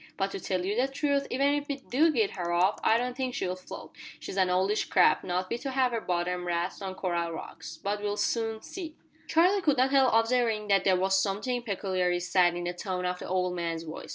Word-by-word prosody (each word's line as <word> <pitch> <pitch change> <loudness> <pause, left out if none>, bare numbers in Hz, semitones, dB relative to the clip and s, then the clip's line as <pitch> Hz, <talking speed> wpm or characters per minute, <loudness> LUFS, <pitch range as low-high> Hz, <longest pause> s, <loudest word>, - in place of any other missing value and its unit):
But 195 0 -1
to 195 - -5
tell 185 -1 -2
you 200 +2 -1
the 250 +3 +2
truth 280 0 0
even 275 +3 +2
if 290 0 -2
we 280 - -2
do 280 +4 +2
git 225 -8 +1
her 175 -2 -3
off 180 +3 +2
I 225 - +4
don't 245 +1 -2
think 255 -1 -3
she'll 180 0 -2
float. 185 - -10 0.3
She's - - -7
an 190 -2 +2
oldish 190 +4 +1
craft, 180 - +4
not 180 +1 -2
fit 235 +5 -4
to 275 - -3
have 260 -1 +1
her 230 -1 -2
bottom 180 0 -2
rasped 175 +3 -2
on 190 -1 -5
coral 170 -3 -2
rocks. 165 0 -8
But 205 +1 -3
we'll 205 0 -2
soon 225 +1 -1
see." 330 -5 -7 0.3
Charlie 365 +5 +3
could 295 -6 +2
not 260 +1 +3
help 270 -2 +4
observing 225 -2 +1
that 195 -1 +3
there 185 -1 +4
was 190 +1 +2
something 215 +6 -1
peculiarly 185 -5 -1
sad 180 0 +2
in 175 - -4
the 175 0 -2
tone 180 0 -4
of 180 0 -2
the - - -7
old 180 -1 0
man's 165 -1 -3
voice. 160 -1 -8
195 Hz, 235 wpm, -28 LUFS, 180-250 Hz, 0.3 s, I